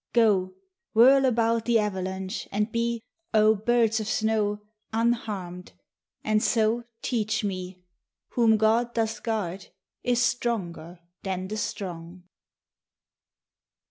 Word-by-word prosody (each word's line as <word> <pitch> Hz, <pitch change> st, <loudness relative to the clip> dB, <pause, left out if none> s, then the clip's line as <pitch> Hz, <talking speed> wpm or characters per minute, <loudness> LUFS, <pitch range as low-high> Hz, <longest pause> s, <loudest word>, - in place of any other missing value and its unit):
Go, 200 Hz, -6 st, +3 dB, 0.4 s
whirl 265 Hz, +4 st, +7 dB
about 230 Hz, -2 st, +1 dB
the 235 Hz, -1 st, +3 dB
avalanche, 190 Hz, -1 st, -3 dB
and 210 Hz, +2 st, -1 dB
be, 235 Hz, 0 st, -1 dB, 0.3 s
O 215 Hz, 0 st, +6 dB
birds 225 Hz, +1 st, +2 dB
of 215 Hz, -, -4 dB
snow, 215 Hz, -2 st, 0 dB, 0.3 s
unharmed, 215 Hz, -6 st, -2 dB, 0.5 s
and 215 Hz, 0 st, +2 dB
so 225 Hz, +2 st, +1 dB, 0.2 s
teach 215 Hz, -3 st, -1 dB
me: 185 Hz, -2 st, -5 dB, 0.5 s
Whom 225 Hz, -2 st, +3 dB
God 230 Hz, +3 st, +2 dB
doth 225 Hz, -1 st, -1 dB
guard 200 Hz, -5 st, -3 dB, 0.3 s
is 245 Hz, -1 st, +1 dB
stronger 185 Hz, -9 st, -2 dB, 0.2 s
than 185 Hz, -1 st, -4 dB
the 215 Hz, -, -3 dB
strong. 180 Hz, -3 st, -5 dB
215 Hz, 110 wpm, -26 LUFS, 190-230 Hz, 0.5 s, whirl